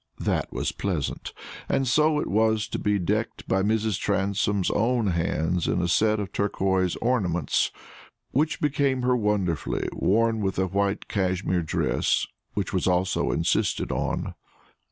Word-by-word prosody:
That -, -, -1 dB
was -, -, -2 dB
pleasant; 85 Hz, -8 st, -3 dB, 0.4 s
and 135 Hz, -1 st, +1 dB
so 150 Hz, +4 st, +3 dB
it -, -, -1 dB
was 110 Hz, +1 st, +2 dB
to -, -, -3 dB
be 105 Hz, 0 st, +1 dB
decked 105 Hz, +4 st, -2 dB
by 95 Hz, -, +2 dB
Mrs. 110 Hz, 0 st, +1 dB
Transome's 100 Hz, -1 st, 0 dB
own 115 Hz, -2 st, +1 dB
hands 85 Hz, 0 st, 0 dB
in -, -, +1 dB
a 90 Hz, -, 0 dB
set 110 Hz, +5 st, +2 dB
of 100 Hz, -3 st, -4 dB
turquoise 95 Hz, -3 st, 0 dB
ornaments, 90 Hz, -, +1 dB, 0.6 s
which 150 Hz, +4 st, +1 dB
became 140 Hz, -3 st, +1 dB
her 125 Hz, 0 st, +3 dB
wonderfully, 105 Hz, -, 0 dB
worn 115 Hz, +3 st, +2 dB
with 95 Hz, -2 st, -1 dB
a 95 Hz, -, +2 dB
white 100 Hz, +2 st, -1 dB
Cashmere 95 Hz, -2 st, 0 dB
dress, 80 Hz, -, 0 dB, 0.3 s
which 100 Hz, -1 st, -2 dB
was 95 Hz, -, 0 dB
also 90 Hz, 0 st, +1 dB
insisted -, -, 0 dB
on. -, -, -2 dB
100 Hz, 145 wpm, -25 LUFS, 95-110 Hz, 0.6 s, so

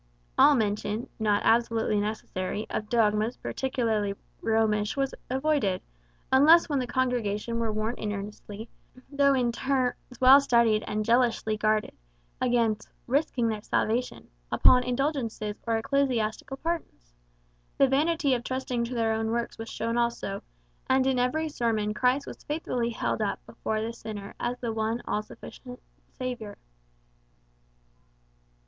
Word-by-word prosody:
All 295 Hz, -, +7 dB
mention, 210 Hz, 0 st, -1 dB
not 210 Hz, -2 st, +2 dB
absolutely 225 Hz, -2 st, +2 dB
necessary, 210 Hz, -1 st, -3 dB
of 215 Hz, -, -3 dB
dogmas 220 Hz, 0 st, +2 dB
peculiarly 225 Hz, -6 st, -1 dB, 0.3 s
Romish 220 Hz, 0 st, +1 dB
was 270 Hz, -1 st, 0 dB, 0.2 s
avoided, 265 Hz, -8 st, +1 dB, 0.5 s
unless 310 Hz, +6 st, +7 dB
when 290 Hz, -4 st, 0 dB
the 250 Hz, -, -2 dB
congregation 235 Hz, -3 st, -1 dB
were 230 Hz, -1 st, 0 dB
warned 215 Hz, +3 st, -2 dB
earnestly, 210 Hz, +1 st, -6 dB, 0.4 s
though 280 Hz, -1 st, +4 dB
in 245 Hz, -2 st, +1 dB
terms 260 Hz, 0 st, 0 dB, 0.2 s
well 265 Hz, +2 st, +8 dB
studied 235 Hz, -5 st, +3 dB
and 215 Hz, 0 st, -1 dB
jealously 230 Hz, -2 st, +2 dB
guarded, 215 Hz, 0 st, +1 dB, 0.5 s
against 235 Hz, -4 st, +1 dB, 0.2 s
"risking 260 Hz, -2 st, +1 dB
their 215 Hz, -1 st, -3 dB
salvation" 235 Hz, +3 st, -1 dB, 0.2 s
upon 250 Hz, -, +6 dB
indulgences 250 Hz, -5 st, -2 dB
or 225 Hz, -1 st, +2 dB
ecclesiastical 250 Hz, -1 st, -1 dB
pardons. 310 Hz, -, -5 dB, 0.6 s
The 275 Hz, -, +5 dB
vanity 290 Hz, +1 st, +2 dB
of 240 Hz, -1 st, -1 dB
trusting 255 Hz, -2 st, -2 dB
to 245 Hz, +2 st, -5 dB
their 225 Hz, -1 st, +1 dB
own 220 Hz, 0 st, -1 dB
works 235 Hz, 0 st, -2 dB
was 225 Hz, 0 st, -6 dB
shown 230 Hz, +2 st, -2 dB
also; 235 Hz, -4 st, -1 dB, 0.5 s
and 260 Hz, 0 st, +4 dB
in 265 Hz, -1 st, +2 dB
every 310 Hz, +6 st, +1 dB
sermon 225 Hz, -7 st, -1 dB
Christ 255 Hz, +5 st, +1 dB
was -, -, -10 dB
faithfully 255 Hz, -6 st, -2 dB
held 230 Hz, -, -2 dB
up -, -, -2 dB
before 215 Hz, 0 st, -3 dB
the 230 Hz, +1 st, -3 dB
sinner 215 Hz, -3 st, -7 dB
as 245 Hz, +1 st, -2 dB
the 235 Hz, -2 st, -3 dB
one 220 Hz, +2 st, -1 dB
all 210 Hz, -, 0 dB
sufficient 250 Hz, +3 st, -11 dB, 0.4 s
Saviour. 245 Hz, -5 st, -5 dB
235 Hz, 135 wpm, -27 LUFS, 215-260 Hz, 0.6 s, well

